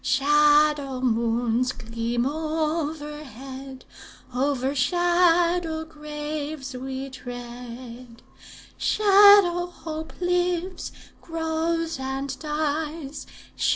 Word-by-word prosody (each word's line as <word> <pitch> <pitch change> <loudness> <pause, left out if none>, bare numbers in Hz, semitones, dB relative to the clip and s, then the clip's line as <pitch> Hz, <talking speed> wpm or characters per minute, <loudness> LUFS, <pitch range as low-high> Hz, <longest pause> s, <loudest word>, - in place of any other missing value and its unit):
Shadow 295 0 +3
moons 235 +1 +1
gleam 230 +1 -2
overhead; 295 -4 -4 0.5
Over 265 +1 0
shadow 345 +1 +2
graves 300 -2 -6
we 265 +1 -5
tread. 245 -1 -9 0.6
Shadow 400 -4 +6
hope 320 -2 -7
lives, 355 0 -1 0.3
grows, 325 -1 -2
and 265 +1 -3
dies. 300 -1 -3
295 Hz, 65 wpm, -25 LUFS, 260-325 Hz, 0.6 s, Shadow